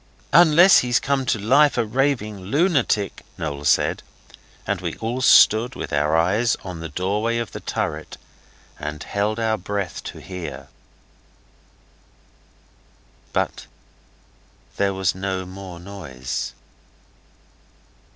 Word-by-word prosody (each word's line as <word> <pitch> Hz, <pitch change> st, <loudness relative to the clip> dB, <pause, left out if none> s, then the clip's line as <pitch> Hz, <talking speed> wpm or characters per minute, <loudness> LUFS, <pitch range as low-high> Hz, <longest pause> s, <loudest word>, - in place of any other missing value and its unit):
'Unless 175 Hz, +3 st, +7 dB
he's 120 Hz, -1 st, +1 dB
come 135 Hz, -2 st, -1 dB
to -, -, +2 dB
life 135 Hz, +8 st, +4 dB
a 120 Hz, -, +2 dB
raving 115 Hz, -3 st, -1 dB
lunatic,' 135 Hz, -, +1 dB, 0.2 s
Noel 75 Hz, -2 st, -4 dB
said, 70 Hz, -, +2 dB, 0.6 s
and -, -, -2 dB
we -, -, -4 dB
all 120 Hz, +3 st, -3 dB
stood 120 Hz, -1 st, +5 dB
with -, -, -6 dB
our 75 Hz, +2 st, +2 dB
eyes 105 Hz, +8 st, +2 dB
on 90 Hz, -3 st, -7 dB
the 80 Hz, 0 st, -6 dB
doorway 105 Hz, +8 st, -1 dB
of 115 Hz, -1 st, -3 dB
the -, -, -7 dB
turret 80 Hz, +1 st, -4 dB, 0.6 s
and 75 Hz, 0 st, -5 dB
held 105 Hz, +2 st, -1 dB
our 110 Hz, -1 st, 0 dB
breath 100 Hz, -3 st, -4 dB
to -, -, -7 dB
hear. 80 Hz, -8 st, -8 dB, 2.6 s
But -, -, -2 dB, 1.1 s
there 100 Hz, -1 st, +1 dB
was 95 Hz, -3 st, +1 dB
no 95 Hz, 0 st, -3 dB
more 95 Hz, -1 st, -9 dB
noise. 85 Hz, -10 st, -6 dB
100 Hz, 115 wpm, -22 LUFS, 85-120 Hz, 2.6 s, Unless